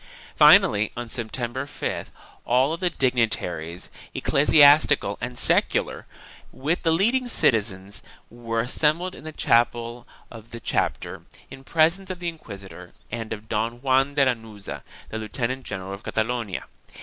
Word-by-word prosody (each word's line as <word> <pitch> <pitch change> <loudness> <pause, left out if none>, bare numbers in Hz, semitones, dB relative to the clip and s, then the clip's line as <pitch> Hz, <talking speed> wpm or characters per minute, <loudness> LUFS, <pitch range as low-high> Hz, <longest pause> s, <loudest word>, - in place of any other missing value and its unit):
Finally, 105 0 +6
on 120 0 -4
September 120 +3 -4
5th - - -4 0.4
all 130 +6 +2
the 180 +1 0
dignitaries, 110 - -1 0.2
eccle 140 +2 +1
siastical 145 -8 +6
and 125 +1 -5
secular, - - +1 0.4
with 155 +6 -2
the 165 - +1
leading 235 +10 +2
citizens, 100 - 0 0.3
were 115 -1 -3
assembled 155 +9 0
in 155 - -12
the 155 - -6
chapel 120 -2 0 0.2
of 115 -1 -12
the 115 - -8
chapter, - - -2 0.3
in 135 - -11
presence 170 +6 +2
of 185 - -4
the 175 -1 -3
inquisitor 100 - -11 0.2
and 115 -1 -5
of 110 0 -6
Don 115 +2 -2
Juan 135 +1 +2
de 140 -2 +4
Lanuza, 115 -5 -4 0.3
the 110 - -5
Lieutenant 120 +4 -3
general 95 -1 -6
of 100 - -8
Catalonia. 115 -3 -2
120 Hz, 135 wpm, -24 LUFS, 110-145 Hz, 0.4 s, Finally